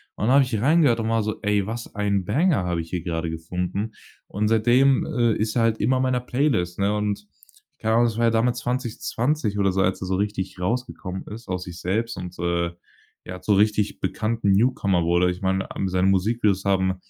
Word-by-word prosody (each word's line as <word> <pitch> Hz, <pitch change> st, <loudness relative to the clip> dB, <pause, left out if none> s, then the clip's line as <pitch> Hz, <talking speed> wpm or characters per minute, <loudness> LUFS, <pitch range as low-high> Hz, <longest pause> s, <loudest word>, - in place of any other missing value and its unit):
Und 105 Hz, -, -2 dB
dann 125 Hz, -, +4 dB
habe 140 Hz, -, +6 dB
ich 110 Hz, -4 st, -2 dB
reingehört 140 Hz, -4 st, +4 dB
und 110 Hz, -, -2 dB
war 115 Hz, -1 st, +1 dB
so: 110 Hz, 0 st, -4 dB
„Ey, 105 Hz, -1 st, +1 dB
was 115 Hz, +1 st, -6 dB
ein 100 Hz, -2 st, 0 dB
Banger 140 Hz, -, +2 dB
habe 85 Hz, -2 st, -1 dB
ich 80 Hz, -, -10 dB
hier 90 Hz, -3 st, -3 dB
gerade 85 Hz, -2 st, -2 dB
gefunden.“ 90 Hz, +6 st, -4 dB, 0.3 s
Und 105 Hz, +2 st, -1 dB
seitdem, 125 Hz, +4 st, +4 dB
äh, 120 Hz, -7 st, +1 dB
ist 110 Hz, +1 st, -2 dB
er 115 Hz, -, +3 dB
halt 115 Hz, -1 st, +1 dB
immer 130 Hz, +5 st, +2 dB
in 130 Hz, -, +1 dB
meiner 130 Hz, -1 st, +1 dB
Playlist, 125 Hz, -, 0 dB
ne, 100 Hz, +2 st, +1 dB
und 105 Hz, -1 st, -2 dB, 0.5 s
keine 110 Hz, 0 st, +1 dB
Ahnung, 120 Hz, +1 st, +4 dB
das 115 Hz, -1 st, -3 dB
war 115 Hz, -, +2 dB
ja 115 Hz, -, +4 dB
damit 115 Hz, +2 st, +2 dB
2020 120 Hz, -1 st, -2 dB
oder 100 Hz, -1 st, +3 dB
so, 95 Hz, +1 st, 0 dB
als 95 Hz, 0 st, 0 dB
er -, -, -4 dB
so 95 Hz, -, 0 dB
richtig 95 Hz, -2 st, -3 dB
rausgekommen 95 Hz, -2 st, -3 dB
ist 115 Hz, +3 st, -9 dB
aus 90 Hz, 0 st, -2 dB
sich 85 Hz, -2 st, -9 dB
selbst 110 Hz, +5 st, -1 dB
und, 90 Hz, 0 st, -7 dB
äh, 85 Hz, 0 st, 0 dB, 0.5 s
ja, 90 Hz, 0 st, -7 dB
zum 105 Hz, -, +2 dB
richtig 105 Hz, 0 st, +1 dB
bekannten 110 Hz, -2 st, 0 dB
Newcomer 100 Hz, -5 st, +2 dB
wurde. 85 Hz, +2 st, +2 dB
Ich 90 Hz, -, -7 dB
meine, 95 Hz, 0 st, -1 dB
am 95 Hz, -, -2 dB
seine 95 Hz, +1 st, +1 dB
Musikvideos 100 Hz, 0 st, +1 dB
haben 95 Hz, -1 st, +2 dB
105 Hz, 215 wpm, -24 LUFS, 95-115 Hz, 0.5 s, habe